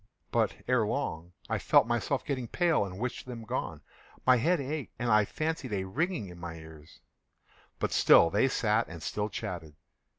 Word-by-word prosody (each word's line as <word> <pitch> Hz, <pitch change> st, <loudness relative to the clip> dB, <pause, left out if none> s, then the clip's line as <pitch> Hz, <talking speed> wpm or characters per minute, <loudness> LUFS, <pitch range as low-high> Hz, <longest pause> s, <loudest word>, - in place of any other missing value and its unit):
But, -, -, +1 dB
ere 125 Hz, -3 st, +3 dB
long, 85 Hz, -4 st, -3 dB
I -, -, -1 dB
felt -, -, +5 dB
myself 120 Hz, +3 st, -1 dB
getting 130 Hz, -4 st, -2 dB
pale 170 Hz, -, +2 dB
and 95 Hz, -1 st, -8 dB
wished 125 Hz, +3 st, -4 dB
them 120 Hz, -2 st, -7 dB
gone. 110 Hz, -, -4 dB, 0.4 s
My 130 Hz, -1 st, +6 dB
head 165 Hz, +8 st, +2 dB
ached, 140 Hz, 0 st, -4 dB
and 120 Hz, -1 st, -1 dB
I 105 Hz, -1 st, +5 dB
fancied 155 Hz, -3 st, -3 dB
a 95 Hz, -2 st, -1 dB
ringing 145 Hz, -, -2 dB
in 90 Hz, -1 st, -11 dB
my 85 Hz, -1 st, -6 dB
ears: 80 Hz, -1 st, -13 dB, 0.8 s
but -, -, -1 dB
still 85 Hz, -, +6 dB
they 105 Hz, +6 st, +3 dB
sat 115 Hz, -3 st, +1 dB
and 85 Hz, -2 st, -9 dB
still 105 Hz, 0 st, -2 dB
chatted. 90 Hz, -8 st, -6 dB
115 Hz, 175 wpm, -30 LUFS, 90-130 Hz, 0.8 s, My